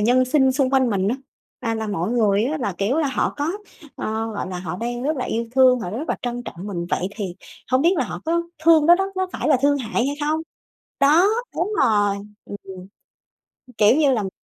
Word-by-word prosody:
nhân 245 +4 +4
sinh 265 0 +3
xung 270 -1 +1
quanh 260 -3 +3
mình 195 -1 0
á, 240 - 0 0.4
à, 230 -2 -1
là 220 0 -3
mọi 195 -2 -2
người 215 -3 +2
á 300 +5 -1
là, 205 -8 -2
kiểu 205 +8 0
là, 305 - +2
họ 265 - -1
có 295 +2 -1 0.5
ờ, 220 +1 -3
gọi 195 - -4
là, 180 - -5
họ 180 0 -5
đang 240 +2 -4
rất 300 +3 0
là 255 - -2
yêu 230 +1 -2
thương, 255 -1 +5
họ 180 - -4
rất 265 +10 -5
là - - 0
trân 245 0 -3
trọng 185 -4 -8
mình 175 -4 -4
vậy 185 - 0
thì 195 -5 -4 0.4
hông 260 +2 +4
biết 345 +3 +4
là 260 - +1
họ 180 -3 -6
có 340 +1 +1 0.2
thương 320 -2 +6
đó 345 - +8
đó, 385 +2 0
nó 375 0 0
phải - - -2
là 285 - +5
thương 285 0 +3
hại 240 +1 -1
hay 285 - -2
không? 305 +2 0 0.6
Đó, 305 +7 +5 0.3
đúng 380 +5 -1
rồi, 205 -2 +2 0.3
ừm, 205 - -7
ừm, 185 -1 -10 0.9
kiểu 210 +4 +5
như, 295 -3 +3
làm 205 -6 -1
245 Hz, 230 wpm, -22 LUFS, 205-285 Hz, 0.9 s, đó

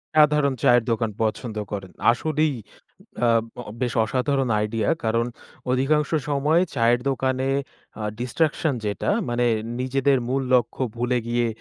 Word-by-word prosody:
সাধারণ 150 -2 +4
চায়ের 120 -1 +5
দোকান 115 -1 0
পছন্দ 110 0 -2
করেন। 95 -3 -5 0.2
আসলেই 155 +3 0 0.7
আব 115 -1 +3 0.4
বেশ 120 -3 0
অসাধারণ 135 +1 0
আইডিয়া। 105 0 -1 0.2
কারণ 115 +1 +1 0.5
অধিকাংশ 140 +3 +1 0.2
সময়ই 150 +5 +2
চায়ের 120 +1 +3
দোকানে 130 0 0 0.5
আ - - -3 0.2
ডিসট্রাকশন 150 +3 0
যেটা 100 -1 -1 0.2
মানে 120 0 0 0.4
নিজেদের 135 +1 +2
মূল 135 +1 0
লক্ষ্য 125 +1 +1
ভুলে 125 +1 0
গিয়ে 120 0 +1
125 Hz, 125 wpm, -24 LUFS, 115-140 Hz, 0.7 s, চায়ের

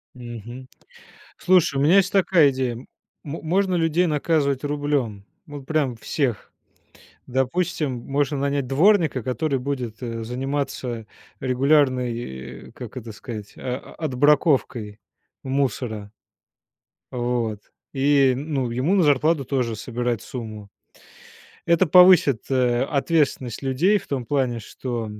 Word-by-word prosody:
Мгм. 120 +1 -9 0.7
Слушай, 175 -6 +3
у - - +1
меня 160 +7 +5
есть 190 -2 +3
такая 180 -7 +4
идея. 130 -2 -2
М 120 - -11 0.4
можно 180 +5 -1
людей 165 +1 +2
наказывать 150 -3 0
рублём, 145 -8 -2 0.2
вот 145 -2 -9
прям 145 -5 0
всех. 120 0 -2 0.7
Допустим, 135 +2 -1 0.2
можно 145 +1 0
нанять 140 -1 -1
дворника, 160 - +3
который 135 +3 -1
будет, 125 -4 -4
э, 115 -1 -4
заниматься 125 -2 -3 0.3
регулярной, 125 - 0
э, - - -17
как 125 -1 -9
это 115 -2 -7
сказать, 105 -1 -8
о 125 0 -6
отбраковкой 135 -7 +1 0.4
мусора. 125 -6 -2 1.0
Вот. 120 -3 -2 0.3
И, 135 -1 +3
ну, 135 -3 -2
ему 130 +11 +1
на 190 - +4
зарплату 150 0 +2
тоже 125 -4 -1
собирать 120 0 -3
сумму. 110 -4 -8 1.0
Это 170 +2 +4
повысит, 180 - +6
э, 125 -2 +2
ответственность 140 -4 0
людей 145 +10 +2
в - - -16
том 130 -4 -3
плане, 130 -3 0
что, 120 +1 -5
135 Hz, 115 wpm, -23 LUFS, 120-150 Hz, 1.0 s, повысит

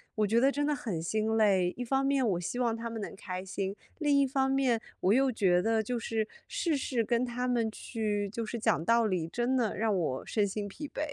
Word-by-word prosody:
我 215 -1 +2
觉 230 +3 +3
得 270 +2 +4
真 290 +1 0
的 300 - +1
很 200 - -3
心 215 +6 0
累， 190 -4 +3
一 250 - -4
方 270 +3 +1
面 275 -3 +2
我 175 - 0
希 180 +8 -4
望 235 -2 +1
他 230 +1 -4
们 225 -2 -5
能 - - -6
开 185 -1 -5
心， 195 +1 -3 0.2
另 290 -3 +3
一 275 - +3
方 265 0 +1
面 260 -4 +2 0.2
我 190 - +2
又 265 +3 +4
觉 185 -6 +3
得， 225 +4 +2
就 240 +3 -2
是 220 -1 -1 0.2
事 370 -12 0
事 255 -3 0
跟 235 +3 +1
他 250 +1 -2
们 235 -3 +1
去 210 -3 -2
就 230 +2 -4
是 235 +2 -4
讲 220 -7 +1
道 230 +1 +4
理， 180 -5 -1
真 240 +8 0
的 230 -4 0
让 215 -3 +1
我 135 -6 -1
身 210 -2 +1
心 205 +1 -4
疲 295 +9 -7
惫。 295 - -6
225 Hz, 260 characters per minute, -30 LUFS, 205-255 Hz, 0.2 s, 得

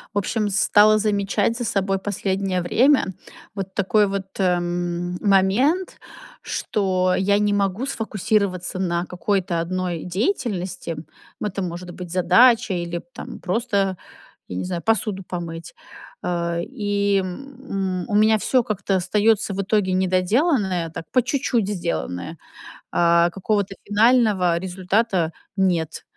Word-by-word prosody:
В - - 0
общем, 210 +2 0
стала 210 +1 +4
замечать 205 +1 0
за 240 - -3
собой 195 -2 0
последнее 190 -2 -1
время 240 +2 +3 0.4
вот 195 -2 -5
такой 205 +2 +2
вот, 195 -1 -3
эм, 175 -1 -1
момент, 210 - +2 0.4
что 185 -3 0
я 200 +2 +2
не 205 0 +1
могу 200 +3 0
сфокусироваться 205 -7 -1
на 175 -1 0
какой-то 180 -1 -1
1 175 0 -2
деятельности. 185 - -2 0.5
Это 200 -2 -3
может 175 0 -5
быть 175 -1 -8
задача 210 +5 +5
или, 170 0 -4
там, - - -8
просто, 195 -1 0 0.5
я 90 - -6
не 90 - -2
знаю, 180 -2 -3
посуду 215 -2 0
помыть. 170 - -6 0.5
Э, 170 -1 -1
и, 205 0 0
м, 195 -3 -4
у 205 - -1
меня 215 +1 +5
всё 250 +4 +2
как-то 210 -3 -1
остаётся 205 +3 +2
в 195 - -1
итоге 195 -1 +1
недоделанное, 185 - +1
так, 165 0 -8
по 255 - +4
чуть-чуть 245 -4 0
сделанное, 170 - -3 0.5
а 170 0 +4
какого-то 195 +2 -1
финального 210 -5 +3
результата 185 0 0 0.2
нет. 175 -5 0
195 Hz, 125 wpm, -22 LUFS, 180-210 Hz, 0.5 s, задача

